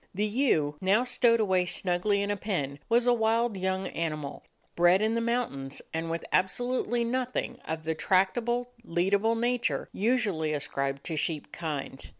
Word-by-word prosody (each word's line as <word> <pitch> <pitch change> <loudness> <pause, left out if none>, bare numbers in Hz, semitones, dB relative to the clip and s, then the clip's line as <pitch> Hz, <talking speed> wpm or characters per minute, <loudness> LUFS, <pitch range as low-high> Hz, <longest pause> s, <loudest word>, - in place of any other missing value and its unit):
The 205 +3 +1
ewe, 205 - +1
now 200 +5 +3
stowed 240 -2 +3
away 185 -4 +2
snugly 190 +3 +1
in 200 - -1
a - - 0
pen, 160 -9 -3
was 235 +1 +4
a 245 - +5
wild 225 0 +1
young 190 0 -1
animal, 155 -4 -4 0.3
bred 175 +2 +5
in 220 +2 +1
the 230 - 0
mountains, 225 - -2
and 165 0 -2
with 165 0 -3
absolutely 240 +4 +1
nothing 250 0 -2
of 160 0 -4
the 160 +1 -1
tractable, 240 +8 +1
lead 175 0 0
able 220 +3 +3
nature 240 +1 0
usually 200 -9 +1
ascribed 140 -1 -2
to 160 -3 -2
sheep 155 -1 -2
kind. 145 -4 -5
195 Hz, 160 wpm, -28 LUFS, 160-235 Hz, 0.3 s, a